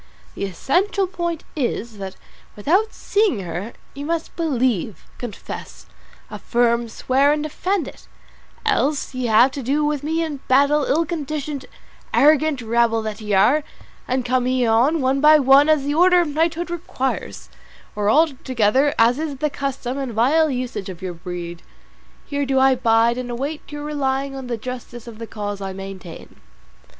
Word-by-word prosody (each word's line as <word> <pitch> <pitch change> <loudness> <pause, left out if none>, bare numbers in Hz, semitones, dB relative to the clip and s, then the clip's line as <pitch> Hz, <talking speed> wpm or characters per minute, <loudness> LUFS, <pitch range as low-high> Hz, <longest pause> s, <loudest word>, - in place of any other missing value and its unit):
The - - -3
essential 360 - 0
point 345 -3 -4
is 235 -6 -3
that 190 -1 -6 0.4
without 365 - +1
seeing 405 - 0
her 180 +5 -5 0.2
you 280 - -7
must 330 +2 -3
believe, 255 - -1 0.2
confess, 235 -5 -8 0.5
affirm, 235 -1 0
swear, 270 +5 +2
and 300 0 0
defend 335 +2 -1
it; - - -12 0.6
else 300 -11 0
ye 255 -1 -2
have 230 +4 +5
to 275 - -5
do 285 +4 0
with 295 -2 -1
me 320 +3 -1
in 310 -3 -4
battle, 280 +2 +4
ill 330 +4 +2
conditioned, 300 -3 -4 0.5
arrogant 300 -2 +4
rabble 230 0 +2
that 215 0 -5
ye 210 -1 -3
are; 250 +11 +4 0.4
and 255 -1 -1
come 255 0 +1
ye 255 -1 +1
on, 245 +8 +3
one 265 +1 +1
by 305 +1 +8
one 280 +1 +5
as 305 -3 +3
the 285 +1 -1
order 360 +3 +5
of 335 - -1
knighthood 330 +3 -1
requires, 315 -6 -4 0.5
or 205 0 0
all 315 +7 +5
together 260 +4 +2
as 235 +4 +4
is 310 -3 -3
the 300 +2 -1
custom 270 -2 -3
and 265 -4 -4
vile 295 +8 +3
usage 245 -7 -4
of 185 0 -9
your 185 -1 -3
breed, 175 0 -7 0.6
here 285 0 -2
do 265 0 +1
I 265 0 +5
bide 235 -1 +2
and 250 -1 -5
await 280 +7 -5
you 295 0 -6
relying 275 -2 -1
on 265 -2 -7
the 240 -1 -2
justice 240 0 -7
of 230 -2 -10
the 230 - -6
cause 205 -2 -5
I 195 -1 -4
maintain." 190 -3 -9
265 Hz, 165 wpm, -21 LUFS, 230-300 Hz, 0.6 s, by